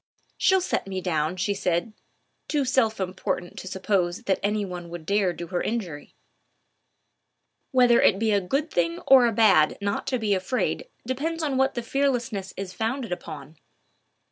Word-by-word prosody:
"She'll 380 Hz, 0 st, +3 dB
soon 360 Hz, -, -4 dB
set -, -, -19 dB
me 190 Hz, -1 st, -3 dB
down," 160 Hz, -2 st, -1 dB
she 200 Hz, +2 st, 0 dB
said, 180 Hz, +1 st, -1 dB, 0.5 s
too 290 Hz, -3 st, 0 dB
self 240 Hz, -5 st, +1 dB
important 185 Hz, -1 st, -3 dB
to -, -, -8 dB
suppose 185 Hz, -2 st, -1 dB
that 190 Hz, -, 0 dB
any 210 Hz, 0 st, 0 dB
one 175 Hz, -2 st, -7 dB
would 170 Hz, -2 st, -8 dB
dare 200 Hz, 0 st, +2 dB
do 170 Hz, 0 st, -7 dB
her 180 Hz, -2 st, -1 dB
an -, -, -2 dB
injury. 180 Hz, -11 st, -5 dB, 1.5 s
Whether 245 Hz, -2 st, +5 dB
it 195 Hz, -, +4 dB
be 220 Hz, +1 st, +1 dB
a 200 Hz, -1 st, +3 dB
good 275 Hz, -, -1 dB
thing 170 Hz, -1 st, 0 dB
or 260 Hz, -3 st, +7 dB
a -, -, +1 dB
bad 205 Hz, -8 st, +4 dB
not 200 Hz, 0 st, -2 dB
to 255 Hz, -, +1 dB
be 215 Hz, -3 st, 0 dB
afraid 225 Hz, -, -1 dB, 0.2 s
depends 315 Hz, +7 st, -2 dB
on 285 Hz, -3 st, 0 dB
what 265 Hz, +1 st, +2 dB
the 240 Hz, -, -3 dB
fearlessness 240 Hz, -7 st, -1 dB
is 190 Hz, -1 st, -5 dB
founded 230 Hz, +3 st, -3 dB
upon. 155 Hz, -4 st, -7 dB
200 Hz, 175 wpm, -25 LUFS, 180-250 Hz, 1.5 s, or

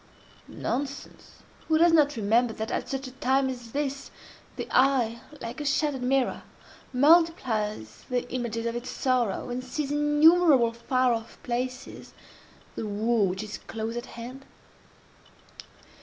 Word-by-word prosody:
Nonsense!—Who 280 Hz, +4 st, -4 dB
does 335 Hz, +1 st, +5 dB
not 295 Hz, -2 st, +4 dB
remember 225 Hz, +2 st, +2 dB
that, 220 Hz, +1 st, -5 dB
at -, -, -3 dB
such 270 Hz, 0 st, -3 dB
a 255 Hz, -, -7 dB
time 265 Hz, +1 st, +1 dB
as 240 Hz, -3 st, -9 dB
this, 280 Hz, 0 st, -3 dB, 0.5 s
the -, -, -5 dB
eye, 250 Hz, -3 st, +3 dB, 0.2 s
like 235 Hz, +5 st, -6 dB
a -, -, -4 dB
shattered 285 Hz, -1 st, 0 dB
mirror, 260 Hz, +1 st, +1 dB, 0.5 s
multiplies 255 Hz, -, +2 dB
the 245 Hz, -1 st, -1 dB
images 230 Hz, -2 st, -3 dB
of 235 Hz, 0 st, -2 dB
its 240 Hz, +1 st, -5 dB
sorrow, 245 Hz, -3 st, 0 dB
and 250 Hz, +1 st, -3 dB
sees 275 Hz, +2 st, -3 dB
in 295 Hz, -, 0 dB
innumerable 295 Hz, -4 st, +5 dB
far 255 Hz, +1 st, +1 dB
off 225 Hz, 0 st, -6 dB
places, 250 Hz, +1 st, -5 dB, 0.6 s
the 220 Hz, -, -4 dB
woe 215 Hz, +1 st, +1 dB
which 190 Hz, +2 st, -2 dB
is 215 Hz, -, -7 dB
close 225 Hz, +1 st, -5 dB
at 240 Hz, +2 st, -5 dB
hand? 255 Hz, +3 st, -8 dB
250 Hz, 140 wpm, -27 LUFS, 230-275 Hz, 0.6 s, does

